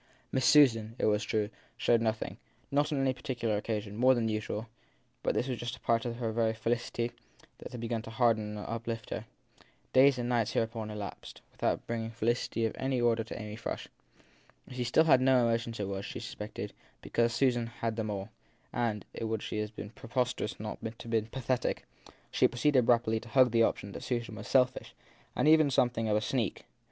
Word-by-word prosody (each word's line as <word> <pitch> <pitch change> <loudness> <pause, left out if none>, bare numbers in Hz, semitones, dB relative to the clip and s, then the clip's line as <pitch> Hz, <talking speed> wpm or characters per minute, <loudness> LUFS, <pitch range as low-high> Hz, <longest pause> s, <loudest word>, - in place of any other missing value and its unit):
Miss 130 -2 +1
Susan, 115 -7 +5
it - - 0
was 105 0 +2
true, 105 0 -1 0.3
showed 120 -2 +3
nothing, 110 -1 -1 0.4
on 145 +1 +4
any 135 -3 +2
particular 120 -4 -2
occasion, 105 -1 -3
more 130 +3 +5
than 115 -2 0
usual; 110 0 -2 0.6
but - - 0
this 125 - +1
was 125 -3 -3
just 120 -1 -3
a - - -17
part 115 0 +1
of 120 0 -3
the 115 -2 -1
very 110 0 +1
felicity 115 +1 -1 0.5
that - - -8
had 125 - -6
begun 115 -1 -2
to 115 - -9
harden 110 -3 +1
and 105 - -6
uplift 115 -1 -4
her. - - -3 0.7
Days 135 +1 +6
and 120 -1 -2
nights 115 -3 +1
hereupon 115 -1 -1
elapsed 105 -1 -7
without - - -1
bringing 115 -1 -3
felicity 115 0 0
of 110 - -1
any 130 -1 0
order 115 -1 +2
to 110 - -7
Amy 105 0 -6
Frush. 115 - -5 0.8
If - - -10
she 125 -1 -1 0.2
had 130 -5 +6
no 130 -2 +5
emotions 115 0 -1
it 100 - -1
was, 95 0 -3
she - - -6
suspected, - - -6 0.3
because 115 0 +1
Susan 120 -1 +2
had 115 -1 -3
them 110 -1 -2
all 100 -2 -2
j 100 - -13 0.4
and 115 -4 -1
it - - -4
would 110 -1 -2
have 105 0 -3
been 105 - -7
preposterous 125 +2 -2
had - - -12
it - - -6
not 115 +1 -6
been 110 -1 +1
pathetic 130 +1 -1 0.5
she - - +4
pro 120 - -10
ceeded 130 -3 +4
rapidly 115 -2 +3
to 115 - -12
hug 130 -2 +5
the 115 0 +4
opinion 100 -2 +1
that - - -6
Susan 120 -2 -2
was 110 - -8
selfish 130 -1 +2 0.4
and - - +2
even 155 -1 +6
something 120 -3 +2
of 105 - +3
a - - 0
sneak. 115 -1 -1
115 Hz, 200 wpm, -31 LUFS, 110-125 Hz, 0.8 s, Days